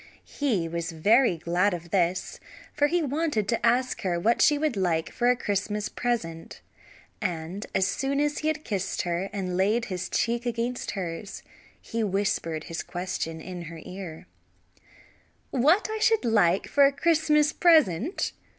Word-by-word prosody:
He 225 - -1
was 170 +1 -3
very 205 +4 +4
glad 175 +4 +1
of 170 -1 -10
this 185 -1 0 0.3
for 290 - +3
he 345 +2 +1
wanted 290 -7 -1
to 230 - 0
ask 250 +2 +2
her 175 -3 -1
what 230 +7 +2
she 295 - +5
would 300 -4 0
like 170 -4 0
for 240 0 +1
a 250 - +4
Christmas 210 -2 -2
present; 165 -10 -3 0.6
and 175 +3 -4
as 190 - +3
soon 270 +7 -1
as 295 0 0
he 310 - -2
had 310 0 -1
kissed 195 - -2
her, 175 +2 -2
and 190 -3 -3
laid 210 +5 +2
his 185 -1 -4
cheek 235 +1 0
against 235 -1 -3
hers, 185 +2 -5 0.4
he 230 0 -3
whispered 195 -6 -1
his 165 +1 -5
question 175 -2 -4
in 175 +1 -7
her 165 0 -9
ear. 180 -4 -8 1.3
"What 305 - +3
should 445 - +3
I - - +2
like 195 -4 +3
for 285 - +4
a - - +1
Christmas 300 0 +2
present?" 315 - +3
205 Hz, 160 wpm, -26 LUFS, 175-265 Hz, 1.3 s, she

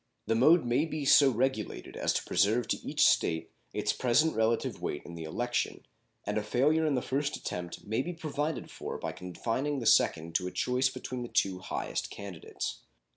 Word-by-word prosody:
The - - +1
mode 150 +7 +5
may 120 +6 +2
be 155 -3 -4
so 140 0 +7
regulated 125 -2 -2
as - - 0
to - - -1
preserve 110 +4 +2
to - - +1
each - - +1
State 80 0 +2 0.2
its - - 0
present 140 +6 +2
relative 110 +1 0
weight 75 - -3
in 85 - -9
the 85 -1 -6
election, 120 +10 -2 0.4
and 105 +1 0
a - - -4
failure 150 +8 +2
in 145 - +2
the 125 - -1
first 140 +2 -1
attempt 85 -1 -6
may 110 +4 0
be 175 +6 -4
provided 155 -2 -3
for - - -5
by - - -4
confining 115 - -3
the 120 - -4
second 85 -6 +3
to 90 - -4
a - - -4
choice 125 +5 +1
between 130 -1 -6
the 120 - -4
two 95 -5 +1
highest 95 - -3
candidates. 100 -5 -6
120 Hz, 190 wpm, -30 LUFS, 100-140 Hz, 0.4 s, so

